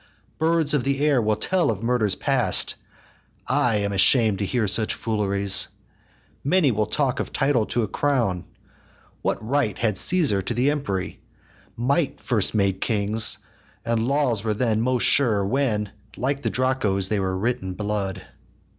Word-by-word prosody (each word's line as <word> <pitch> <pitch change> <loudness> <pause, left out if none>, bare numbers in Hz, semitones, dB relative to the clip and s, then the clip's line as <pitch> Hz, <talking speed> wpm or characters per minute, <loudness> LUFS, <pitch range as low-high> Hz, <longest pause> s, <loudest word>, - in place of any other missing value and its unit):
Birds 160 -1 +1
of 145 -4 +1
the 140 0 -1
air 140 -5 +3
will 110 -1 +1
tell 185 - 0
of 110 -1 -3
murders 115 -5 0
past! - - +1 0.7
I 120 -3 +2
am 100 -1 -1
asham'd 105 +1 +3
to 100 - -2
hear 120 -2 0
such 110 +2 +1
fooleries. 100 -3 +1 0.8
Many 155 -1 +3
will 105 -1 -1
talk 140 -3 0
of - - -4
title 135 -6 +1
to 120 - -1
a - - -2
crown: 115 -8 -1 0.8
What 110 - -3
right 135 -6 0
had 105 -4 0
Caesar 150 - +4
to 105 +5 -4
the 125 +4 +2
empery? 100 -11 -3 0.6
Might 140 +4 0
first 110 -4 0
made 100 -2 0
kings, 110 0 +1 0.5
and 115 0 0
laws 135 -7 +1
were 110 -1 -1
then 110 -1 0
most 125 0 0
sure 110 -8 +3
When, 105 -3 -1 0.3
like 135 +2 -2
the - - -1
Draco's, 120 -7 0
they 105 - 0
were 95 -1 -2
writ 120 +6 -1
in 95 0 -5
blood. 100 -1 -3
115 Hz, 160 wpm, -23 LUFS, 100-135 Hz, 0.8 s, Caesar